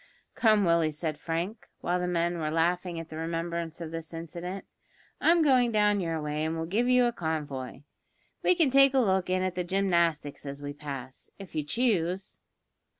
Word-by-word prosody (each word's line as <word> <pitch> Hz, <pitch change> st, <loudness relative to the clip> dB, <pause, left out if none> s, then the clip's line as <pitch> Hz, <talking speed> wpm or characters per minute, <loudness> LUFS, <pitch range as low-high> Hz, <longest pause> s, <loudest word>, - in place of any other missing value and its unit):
"Come, 215 Hz, -3 st, +4 dB
Willie," 170 Hz, -2 st, +3 dB
said 155 Hz, 0 st, -4 dB
Frank, 170 Hz, +8 st, -3 dB
while 180 Hz, +1 st, 0 dB
the 180 Hz, -, -1 dB
men 175 Hz, 0 st, 0 dB
were 155 Hz, -1 st, -1 dB
laughing 170 Hz, +2 st, 0 dB
at 165 Hz, 0 st, -8 dB
the 155 Hz, -, -7 dB
remembrance 165 Hz, 0 st, -3 dB
of 160 Hz, -1 st, -5 dB
this 165 Hz, 0 st, -7 dB
incident. 170 Hz, +4 st, -6 dB, 0.5 s
"I'm 335 Hz, 0 st, +4 dB
going 255 Hz, -5 st, +4 dB
down 210 Hz, -1 st, +3 dB
your 165 Hz, -3 st, -1 dB
way 150 Hz, 0 st, -2 dB
and 160 Hz, +1 st, -1 dB
will 160 Hz, -, -2 dB
give 220 Hz, +9 st, +1 dB
you 250 Hz, -1 st, +5 dB
a 240 Hz, -, +2 dB
convoy. 145 Hz, -, -4 dB, 0.6 s
We 365 Hz, -, +4 dB
can 325 Hz, -6 st, +3 dB
take 275 Hz, 0 st, +6 dB
a -, -, +5 dB
look 190 Hz, -6 st, +2 dB
in 185 Hz, 0 st, +1 dB
at 185 Hz, -1 st, -1 dB
the 180 Hz, 0 st, -2 dB
gymnastics 170 Hz, -6 st, 0 dB
as 140 Hz, 0 st, -6 dB
we 145 Hz, 0 st, -5 dB
pass, 135 Hz, -3 st, -8 dB
if 195 Hz, -2 st, -11 dB
you 155 Hz, -1 st, -1 dB
choose." 190 Hz, -, -1 dB
170 Hz, 190 wpm, -28 LUFS, 160-195 Hz, 0.6 s, take